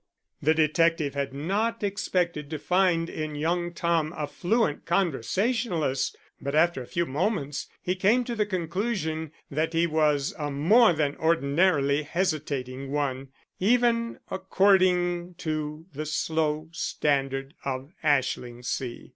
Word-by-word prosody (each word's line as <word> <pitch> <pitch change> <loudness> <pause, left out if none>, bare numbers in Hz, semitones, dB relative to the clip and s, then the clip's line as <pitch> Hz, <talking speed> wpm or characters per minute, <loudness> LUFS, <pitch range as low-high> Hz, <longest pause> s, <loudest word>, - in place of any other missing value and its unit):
The 155 +2 +3
detective 160 -1 +2
had 140 -1 -2
not 205 +11 -1
expected 180 -6 -1
to 155 - -3
find 180 0 +2
in 155 -2 -4
young 175 +3 -1
Tom 170 -2 0
a 150 - -1
fluent 195 +1 0
conversationalist, 175 - 0 0.2
but 140 +1 -2
after 165 -3 +3
a 125 - -9
few 170 0 -1
moments 145 -1 -2 0.2
he 180 - 0
came 210 +7 +3
to 240 - -4
the 215 -2 0
conclusion 170 -3 -2 0.2
that 155 +3 -1
he 165 +1 +3
was 150 -3 +1
a 150 -1 -2
more 175 - +5
than 150 -2 0
ordinarily 150 -2 +2
hesitating 145 -6 -2
one, 135 -2 -1 0.3
even 235 +2 +2
according 185 -2 +2
to 155 -1 -4
the 155 +2 -4
slow 155 0 -1
standard 135 -4 -1
of 135 +3 -4
Ashlingsea. 125 -3 -1
160 Hz, 125 wpm, -27 LUFS, 145-185 Hz, 0.3 s, more